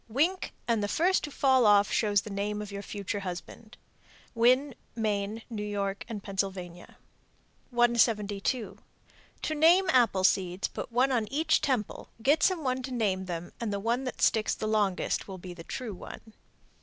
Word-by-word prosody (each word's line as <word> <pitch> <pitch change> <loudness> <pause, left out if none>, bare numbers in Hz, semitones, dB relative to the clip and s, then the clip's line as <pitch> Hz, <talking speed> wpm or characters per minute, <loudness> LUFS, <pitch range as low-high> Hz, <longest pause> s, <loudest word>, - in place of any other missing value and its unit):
Wink 320 +11 0 0.2
and 230 -3 +2
the 205 - 0
first 360 - +2
to - - -7
fall 265 -3 +3
off 205 -2 +5
shows 205 -3 +2
the 210 - -9
name 205 +1 -2
of 210 -1 -6
your 200 0 -5
future 205 0 -4
husband. 195 +4 -8 0.6
Winn, 255 +4 +3 0.2
Me., 215 0 -2
New 220 -3 -5
York, 200 -1 -3
and 210 -3 -6
Pennsylvania. 190 -3 -5 0.7
172. 235 -2 +1 0.6
To 310 - -1
name 335 +5 +5
apple 235 -8 +3
seeds, 185 0 +2
put - - -7
one 255 +3 +2
on 225 -4 0
each 315 +2 +2
temple, 255 -8 -2
get 285 +7 +3
some 365 -4 +2
one 255 -1 -1
to 260 +1 -6
name 200 -6 0
them, 175 -1 -5
and 225 -3 -2
the 200 - -2
one 235 +5 -1
that 255 - -4
sticks 220 -2 +2
the - - -4
longest 210 -4 0
will 190 -2 -7
be 180 0 -9
the 170 -1 -10
true 235 +3 -5
one. 220 +4 -11
215 Hz, 170 wpm, -29 LUFS, 200-255 Hz, 0.7 s, off